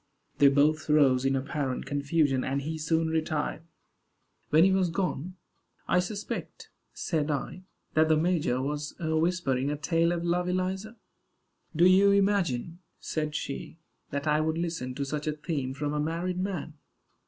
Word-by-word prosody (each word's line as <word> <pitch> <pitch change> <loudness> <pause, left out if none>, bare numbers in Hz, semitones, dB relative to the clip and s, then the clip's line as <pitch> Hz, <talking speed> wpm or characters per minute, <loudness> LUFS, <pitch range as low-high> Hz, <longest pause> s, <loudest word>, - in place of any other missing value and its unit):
They 140 - +7
both 150 +3 +3
rose 135 -4 +4
in 135 0 +2
apparent 135 -1 -2
confusion, 140 -1 +1
and 135 +1 -2
he 160 +2 -4
soon 160 +1 +1
retired. 155 -1 -1 0.9
When 155 +2 +6
he 190 - +5
was 190 -2 +2
gone, 180 -1 -2 0.5
"I 180 - +3
suspect," 200 +3 -5 0.2
said 155 -3 -2
I, 150 +5 -3 0.3
"that 155 0 +3
the 155 - +4
major 155 -6 +1
was 145 +1 -3
whispering 160 -5 0
a 150 - -2
tale 165 +3 +1
of 170 -1 -2
love, 180 +1 0
Eliza." 190 +5 -2 0.8
"Do 170 +3 +5
you 190 +2 +6
imagine," 190 -6 +1 0.2
said 155 -1 -3
she, 140 +2 -5 0.3
"that 140 +1 -3
I 150 0 +2
would 160 +1 0
listen 165 -7 -3
to 140 - -2
such 150 +2 -4
a 155 - +1
theme 150 -3 -3
from 145 +1 -2
a 150 - -1
married 170 +4 -2
man?" 170 -6 -4
155 Hz, 155 wpm, -28 LUFS, 145-175 Hz, 0.9 s, They